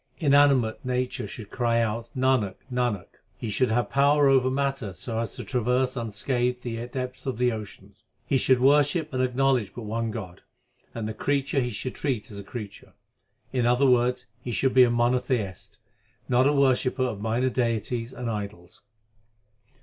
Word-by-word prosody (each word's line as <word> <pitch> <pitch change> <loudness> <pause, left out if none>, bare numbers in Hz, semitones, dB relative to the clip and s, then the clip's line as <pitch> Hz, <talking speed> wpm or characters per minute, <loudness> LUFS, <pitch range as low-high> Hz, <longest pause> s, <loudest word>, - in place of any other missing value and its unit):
Inanimate 140 -6 +3
nature 125 0 -2
should 110 -4 -10
cry 120 -2 +1
out 115 +1 -1
Nanak, 130 -7 +2 0.2
Nanak! 120 -6 -2 0.2
He 110 - -4
should 125 +4 +1
have 120 +2 0
power 140 +1 +4
over 130 -1 +4
matter 135 -6 -1
so 115 +1 -4
as 115 - -4
to - - -6
traverse 125 +1 0
unscathed 125 +2 -1
the 115 -1 -4
depths 125 +1 -5
of 130 - -2
the 125 0 +2
ocean. 105 -2 -8 0.3
He 135 - +1
should 130 0 +3
worship 145 +3 +3
and 130 - 0
acknowledge 130 -3 +1
but 120 - -6
one 115 +2 -2
God, 95 -6 -7 0.5
and 115 -2 -3
the 110 - -4
creature 140 +4 0
he 125 -2 0
should 120 +3 -5
treat 125 -7 -3
as 100 - -8
a - - -7
creature. 105 -1 -9 0.6
In 125 -2 +1
other 125 +3 +3
words 125 0 +2 0.2
he 120 - -5
should 130 +4 +1
be 130 - +8
a - - +1
mono 120 +1 +2
theist, 110 -7 -4 0.5
not 130 +1 +4
a - - +4
worshipper 130 -2 +2
of 115 -6 -3
minor 120 +4 0
deities 115 0 -1
and 125 -2 -6
idols. 100 -5 -6
125 Hz, 170 wpm, -26 LUFS, 115-130 Hz, 0.6 s, be